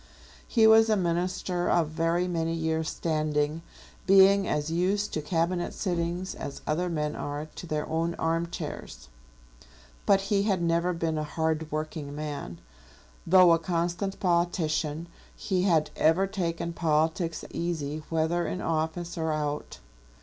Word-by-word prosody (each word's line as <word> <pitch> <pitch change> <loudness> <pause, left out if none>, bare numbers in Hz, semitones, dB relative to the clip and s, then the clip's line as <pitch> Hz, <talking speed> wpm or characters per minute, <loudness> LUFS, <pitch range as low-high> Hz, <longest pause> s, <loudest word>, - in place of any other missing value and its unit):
He 225 -3 +4
was 220 0 +7
a 215 - +3
minister 175 0 -1
of 165 -3 +2
very 165 +3 0
many 165 -2 -1
years' 160 -1 -1
standing, 155 -1 -1 0.5
being 195 0 +6
as 150 +1 -1
used 190 +5 0
to 155 - -1
cabinet 170 +3 -1
sittings 175 0 -2
as 140 - -7
other 175 +4 0
men 150 -2 -2
are 145 +1 -4
to 155 +3 -10
their 150 -1 -2
own 165 +2 -1
armchairs; 160 - -4 1.0
but 195 -1 +5
he 200 0 +1
had 200 -3 +1
never 170 +1 +1
been 165 -2 -1
a - - -1
hard 160 +1 -2
working 155 -1 -4
man. 150 - -5 0.7
Though 185 0 +7
a 165 - +4
constant 175 +3 -2
politician, 170 -3 0 0.3
he 185 -2 -1
had 155 -5 +2
ever 165 +5 +3
taken 170 -4 -3
politics 160 0 0
easy 155 -3 -3
whether 165 +2 0
in 185 - -3
office 165 +1 -2
or 160 0 0
out. 150 -1 -3
165 Hz, 140 wpm, -28 LUFS, 155-180 Hz, 1.0 s, was